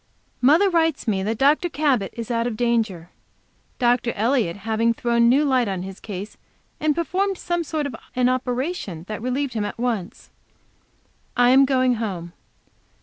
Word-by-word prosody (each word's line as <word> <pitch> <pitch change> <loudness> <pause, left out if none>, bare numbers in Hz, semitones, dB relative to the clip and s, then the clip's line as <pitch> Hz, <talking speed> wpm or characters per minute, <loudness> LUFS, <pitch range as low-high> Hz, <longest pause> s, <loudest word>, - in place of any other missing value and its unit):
MOTHER 310 +10 +5
writes 325 -7 +1
me 195 -3 +1
that 215 +3 -2
Dr. 295 +7 +3
Cabot 275 - 0
is 230 0 -5
out 230 0 0
of 225 -3 -4
danger, 220 -8 -1 0.7
Dr. 245 -1 +2
Elliott 225 -5 +1
having 225 +1 +1
thrown 235 0 +2
new 280 +5 +4
light 260 -4 +2
on 190 -2 -3
his 190 0 -8
case, 200 0 -7 0.4
and 305 -1 +1
performed 375 +3 -1
some 345 -1 -2
sort 310 -2 -2
of 275 -4 -4 0.2
an 250 0 +3
operation 255 - -2
that 215 0 -5
relieved 255 +2 -2
him 215 -3 -1
at 205 - -5
once. 230 -5 -3 1.1
I 245 0 +5
am 270 +1 +6
going 255 -2 +2
home. 180 -6 -4
245 Hz, 160 wpm, -23 LUFS, 215-280 Hz, 1.1 s, am